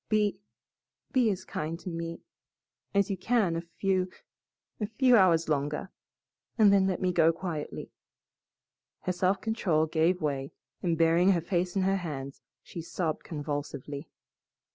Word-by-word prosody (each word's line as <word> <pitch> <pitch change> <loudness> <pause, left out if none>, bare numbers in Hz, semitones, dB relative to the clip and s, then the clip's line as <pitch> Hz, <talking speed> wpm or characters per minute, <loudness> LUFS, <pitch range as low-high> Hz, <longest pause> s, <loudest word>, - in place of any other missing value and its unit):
Be 210 -3 +2 0.7
be 250 -4 +3
as 190 -2 -3
kind 160 +2 -4
to - - -12
me 165 0 -5 0.7
as 200 0 +2
you 195 - -1
can 205 -3 +1
a 165 - -1
few 185 +2 -1 0.7
a 210 - -1
few 250 +3 +4
hours 175 -6 +5
longer, 150 +4 -1 0.7
and 210 -3 +6
then 195 -1 +4
let 185 -2 -1
me 180 -1 +1
go 165 -1 +5
quietly." 165 -3 -5 1.1
Her 185 - -1
self 185 +2 +1
control 190 -9 +1
gave 165 +3 +2
way, 140 -4 -2 0.3
and 170 -3 0
burying 170 +4 +5
her 175 - +2
face 175 +2 -1
in 195 - +2
her 195 +1 +2
hands, 140 -6 -6 0.2
she 170 - -7
sobbed 165 -1 -3
convulsively. 145 -1 -5
175 Hz, 145 wpm, -29 LUFS, 160-195 Hz, 1.1 s, and